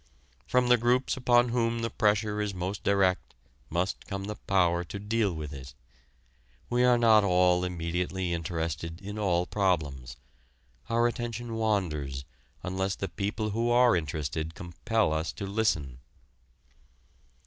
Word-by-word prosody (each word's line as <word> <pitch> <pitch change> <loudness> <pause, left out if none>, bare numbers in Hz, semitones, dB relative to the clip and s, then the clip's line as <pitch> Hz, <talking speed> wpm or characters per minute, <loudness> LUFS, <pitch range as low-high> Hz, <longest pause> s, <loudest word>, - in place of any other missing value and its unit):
From 125 0 +3
the 125 - +7
groups 120 +3 +1
upon 125 -1 +3
whom 115 -1 0
the 115 - -1
pressure 105 0 +1
is 105 -2 -2
most 95 +3 -3
direct 95 -2 +1 0.3
must 85 +3 -2
come 95 -2 -4
the 105 +2 -4
power 90 -4 +1
to 90 +4 -7
deal 105 0 0
with 75 -3 -6
it. 65 -2 -10 1.0
We 120 +1 +3
are 125 -1 +5
not 110 -3 +5
all 90 -1 +3
immediately 90 +1 -2
interested 85 -1 -3
in 105 +1 -7
all 90 -4 +1
problems: 75 - -1 0.7
our 115 +1 +2
attention 120 -1 -3
wanders 80 -12 -1 0.4
unless 95 +1 -1
the 95 - -4
people 105 +6 -2
who 115 +3 0
are 120 -2 +5
interested 80 0 -3
compel 90 +3 -1
us 80 +1 -1
to 100 - -6
listen. 95 - -1
95 Hz, 135 wpm, -28 LUFS, 85-115 Hz, 1.0 s, the